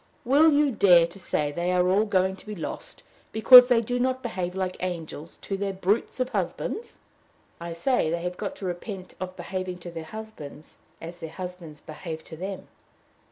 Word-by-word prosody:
Will 295 +6 +6
you 290 -1 +3
dare 180 -6 +6
to 170 +4 -11
say 150 -5 -1
they 175 +4 -1
are 180 0 +3
all 200 +4 +3
going 190 -2 +1
to - - -14
be 210 - -5
lost 350 - -7 0.3
because 250 +3 +9
they 245 -2 +4
do 245 +2 -2
not 260 +1 0
behave 185 -6 -3
like 185 -1 -2
angels 165 -3 -5
to 195 - -3
their 195 0 -2
brutes 195 +7 -1
of 255 0 0
husbands?" 460 - -3 0.6
"I 170 0 -5
say, 205 0 +1
they 170 +1 -2
have 180 0 -3
got 205 +2 -5
to 195 - -8
repent 185 +1 -6
of 185 0 -5
behaving 185 -1 -4
to 175 - -6
their 165 -1 -7
husbands 160 -7 -10 0.2
as 170 +2 -8
their 165 -2 -6
husbands 180 -4 -8
behave 160 0 -7
to 160 - -10
them." 190 +3 -6
185 Hz, 190 wpm, -26 LUFS, 170-220 Hz, 0.6 s, because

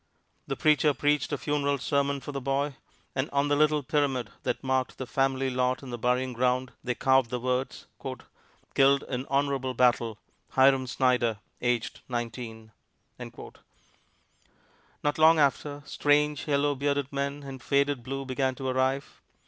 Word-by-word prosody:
The - - -2
preacher 150 -1 +3
preached 145 -1 +1
a 145 - 0
funeral 145 -1 0
sermon 140 +1 0
for 145 - -6
the 140 -1 -4
boy, 140 +2 0 0.4
and 130 +2 -1
on 140 +1 +1
the 145 - +3
little 150 0 +3
pyramid 135 -6 0
that - - -2
marked 130 -1 0
the 130 - -4
family 135 +1 0
lot 125 +1 0
in 130 - -8
the 120 - -4
burying 125 +2 0
ground 125 +1 0
they 125 -1 -1
carved 130 -2 +3
the 125 - -2
words: 125 +2 -2 0.9
"Killed 140 0 +4
in 130 0 -4
honorable 135 -2 0
battle, 120 -3 +2 0.4
Hiram 135 -1 +4
Snyder, 125 -3 +1 0.2
aged 120 -2 -1
nineteen." 115 -2 -5 0.5
Not 145 +1 -10
long 160 +1 +7
after, 145 0 +1
strange, 150 +1 +1
yellow, 145 0 +2
bearded 140 0 -1
men 140 +1 -2
in 135 -1 -8
faded 140 0 +1
blue 135 +3 -5
began 130 0 -1
to 130 +1 -5
arrive. 130 +2 -1
135 Hz, 150 wpm, -28 LUFS, 125-140 Hz, 0.9 s, long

